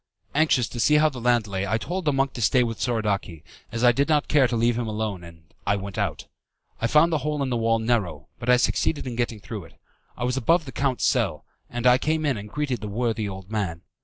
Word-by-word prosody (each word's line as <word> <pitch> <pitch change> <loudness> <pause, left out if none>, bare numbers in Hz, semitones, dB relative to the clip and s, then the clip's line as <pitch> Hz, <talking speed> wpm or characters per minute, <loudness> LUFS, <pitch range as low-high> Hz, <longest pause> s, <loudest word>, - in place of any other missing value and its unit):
Anxious 140 -5 +3
to 120 - -7
see 150 +6 +4
how 155 +1 +5
the 130 -4 -8
land 120 -2 +3
lay, 100 -1 -3
I 110 +3 +1
told 180 - -4
the 150 - +3
monk 135 0 0
to 120 - -6
stay 125 +4 +4
with 115 -2 -4
Soradaci, 100 -9 -1 0.3
as 115 +1 -3
I 120 - +7
did 140 +5 0
not 150 -2 +2
care 140 -4 +4
to 120 - -2
leave 115 +1 +2
him 120 -1 -2
alone, 105 -4 -3
and 80 -1 -15
I 100 - +3
went 100 -1 -6
out. - - -2 0.6
I 115 - +2
found 160 +6 +4
the 155 - +2
hole 150 0 -1
in 130 - -2
the - - +1
wall 115 0 +2
narrow, 105 -11 -1
but 120 0 -4
I 125 - +7
succeeded 145 +4 0
in 125 -2 -4
getting 120 -2 -2
through 105 -3 -7
it. - - -19 0.4
I - - -4
was 125 +1 0
above 165 +6 +2
the 130 - -7
count's 135 -2 0
cell, - - 0 0.2
and 120 0 -4
I 125 0 +6
came 155 +2 0
in 140 -3 +1
and 105 0 -7
greeted 135 -2 -2
the 105 - -4
worthy 110 0 -1
old 95 +1 -9
man. 95 -6 -2
120 Hz, 250 wpm, -25 LUFS, 105-135 Hz, 0.6 s, I